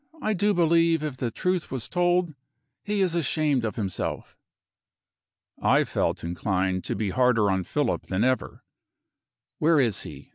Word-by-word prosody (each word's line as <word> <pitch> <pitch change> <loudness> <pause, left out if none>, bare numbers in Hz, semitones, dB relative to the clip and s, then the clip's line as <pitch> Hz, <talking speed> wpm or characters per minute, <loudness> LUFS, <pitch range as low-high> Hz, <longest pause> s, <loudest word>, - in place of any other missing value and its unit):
I 215 - 0
do 205 +1 +1
believe, 165 -1 +3
if 150 -4 -4
the 125 -2 -2
truth 180 +8 -1
was 130 -4 -5
told, 175 -1 +1 0.5
he 205 0 -1
is 185 -3 +2
ashamed 150 -5 +1
of 110 -3 -2
himself." 95 -5 -4 1.3
I - - +4
felt - - -1
inclined 95 +2 -1
to - - -2
be 105 -3 -2
harder 125 -5 +3
on 95 -1 -1
Philip - - -1
than 95 +4 0
ever. 130 +1 -1 1.0
"Where 160 0 +4
is 115 -7 +1
he?" - - -10
135 Hz, 150 wpm, -26 LUFS, 105-175 Hz, 1.3 s, I